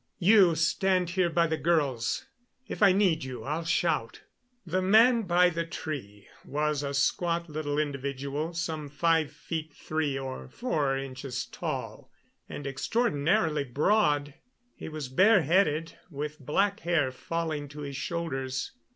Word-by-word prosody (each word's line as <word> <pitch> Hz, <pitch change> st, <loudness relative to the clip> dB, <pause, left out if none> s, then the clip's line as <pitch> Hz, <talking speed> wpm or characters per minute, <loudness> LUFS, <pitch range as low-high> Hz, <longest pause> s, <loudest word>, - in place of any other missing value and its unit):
"You 185 Hz, -2 st, +5 dB
stand 180 Hz, +2 st, +1 dB
here 185 Hz, -1 st, +2 dB
by 170 Hz, 0 st, +2 dB
the 160 Hz, -1 st, -1 dB
girls. 140 Hz, -9 st, 0 dB, 0.4 s
If -, -, -6 dB
I 200 Hz, -2 st, +7 dB
need 185 Hz, -6 st, +2 dB
you, 130 Hz, -1 st, -6 dB
I'll 155 Hz, +4 st, -3 dB
shout." 155 Hz, -9 st, 0 dB, 0.4 s
The 185 Hz, +2 st, 0 dB
man 225 Hz, +3 st, +5 dB
by 180 Hz, +1 st, +4 dB
the 170 Hz, 0 st, -2 dB
tree 140 Hz, -, -7 dB, 0.2 s
was 150 Hz, 0 st, -1 dB
a 140 Hz, -1 st, -3 dB
squat 170 Hz, +4 st, +1 dB
little 150 Hz, -2 st, -3 dB
individual, 140 Hz, +2 st, -3 dB
some 160 Hz, -3 st, -3 dB
five 160 Hz, +1 st, +1 dB
feet 160 Hz, 0 st, -5 dB
three 155 Hz, -3 st, -2 dB
or 135 Hz, -1 st, -6 dB
four 145 Hz, -, -1 dB
inches 130 Hz, -2 st, -5 dB
tall, -, -, -5 dB, 0.4 s
and 145 Hz, -, -7 dB
extraordinarily 150 Hz, -, +1 dB
broad. 145 Hz, -, +1 dB, 0.4 s
He -, -, -8 dB
was 155 Hz, -3 st, -5 dB
bareheaded, 165 Hz, -, +3 dB
with 150 Hz, 0 st, -5 dB
black 195 Hz, -, 0 dB
hair 165 Hz, -9 st, +1 dB
falling 155 Hz, +1 st, -3 dB
to 150 Hz, +1 st, -9 dB
his 140 Hz, -1 st, -6 dB
shoulders. 135 Hz, -5 st, -3 dB
155 Hz, 135 wpm, -28 LUFS, 140-170 Hz, 0.4 s, I